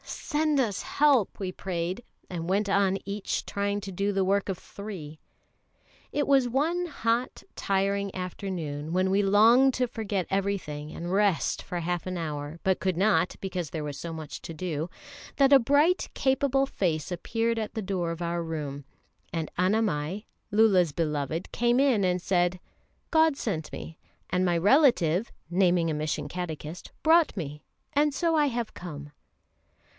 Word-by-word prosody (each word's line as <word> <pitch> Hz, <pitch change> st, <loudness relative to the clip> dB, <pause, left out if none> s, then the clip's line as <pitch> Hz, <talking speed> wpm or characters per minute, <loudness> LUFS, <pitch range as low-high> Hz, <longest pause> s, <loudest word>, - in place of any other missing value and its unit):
"Send 305 Hz, -2 st, -1 dB
us 215 Hz, -7 st, 0 dB
help!" 280 Hz, -8 st, +2 dB
we 190 Hz, -2 st, -3 dB
prayed, 185 Hz, +3 st, -3 dB, 0.2 s
and 170 Hz, -1 st, -5 dB
went 200 Hz, +2 st, +1 dB
on 195 Hz, -1 st, +2 dB
each 200 Hz, +1 st, -3 dB
trying 200 Hz, 0 st, -1 dB
to 195 Hz, -1 st, -6 dB
do 200 Hz, +3 st, 0 dB
the 195 Hz, -1 st, +1 dB
work 200 Hz, +1 st, +1 dB
of 190 Hz, -, -2 dB
three. 180 Hz, -7 st, -8 dB, 0.9 s
It 290 Hz, -, 0 dB
was 270 Hz, -3 st, +4 dB
one 330 Hz, +8 st, 0 dB
hot, 240 Hz, -5 st, -1 dB
tiring 200 Hz, 0 st, 0 dB
afternoon, 170 Hz, -5 st, -4 dB
when 185 Hz, +1 st, +2 dB
we 195 Hz, +1 st, +3 dB
longed 225 Hz, +7 st, +5 dB
to 250 Hz, -1 st, +1 dB
forget 210 Hz, -6 st, -2 dB
everything 190 Hz, -7 st, -2 dB
and 175 Hz, +2 st, -5 dB
rest 200 Hz, -3 st, +2 dB
for 175 Hz, -2 st, -4 dB
half 175 Hz, +1 st, -2 dB
an 185 Hz, -1 st, -3 dB
hour, 150 Hz, -1 st, -4 dB
but 190 Hz, -1 st, +2 dB
could 185 Hz, -1 st, -1 dB
not, 180 Hz, -3 st, +2 dB
because 185 Hz, -5 st, -3 dB
there 160 Hz, -2 st, -4 dB
was 145 Hz, -2 st, -5 dB
so 170 Hz, -, -5 dB
much 160 Hz, -2 st, -7 dB
to 165 Hz, -, -6 dB
do, 165 Hz, -1 st, -3 dB, 0.5 s
that 275 Hz, 0 st, +5 dB
a 275 Hz, -, +9 dB
bright, 290 Hz, +9 st, +3 dB
capable 270 Hz, 0 st, +2 dB
face 175 Hz, -, -1 dB
appeared 225 Hz, +6 st, -1 dB
at 220 Hz, +1 st, -4 dB
the 220 Hz, -, -1 dB
door 185 Hz, -4 st, -2 dB
of 165 Hz, +1 st, -5 dB
our 170 Hz, 0 st, -1 dB
room, 150 Hz, -4 st, -5 dB, 0.5 s
and 165 Hz, -2 st, -3 dB
Annamai, 185 Hz, -2 st, 0 dB, 0.2 s
Lulla's 195 Hz, -7 st, +4 dB
beloved, 155 Hz, +1 st, -2 dB
came 240 Hz, +1 st, +2 dB
in 260 Hz, -7 st, +3 dB
and 180 Hz, -1 st, +2 dB
said: 175 Hz, 0 st, +1 dB, 0.5 s
"God 320 Hz, -3 st, +4 dB
sent 165 Hz, -, -3 dB
me, 160 Hz, -, -8 dB, 0.3 s
and 180 Hz, +1 st, +2 dB
my 175 Hz, -2 st, +2 dB
relative" 205 Hz, -, +4 dB, 0.2 s
(naming 175 Hz, -2 st, +3 dB
a -, -, -1 dB
mission 150 Hz, -1 st, -2 dB
catechist) 165 Hz, 0 st, -6 dB
"brought 325 Hz, +1 st, +5 dB
me. 150 Hz, -3 st, -5 dB, 0.3 s
And 295 Hz, 0 st, +3 dB
so 335 Hz, +2 st, +1 dB
I 300 Hz, -2 st, +4 dB
have 240 Hz, -4 st, -3 dB
come!" 150 Hz, -4 st, -8 dB
190 Hz, 160 wpm, -27 LUFS, 170-230 Hz, 0.9 s, a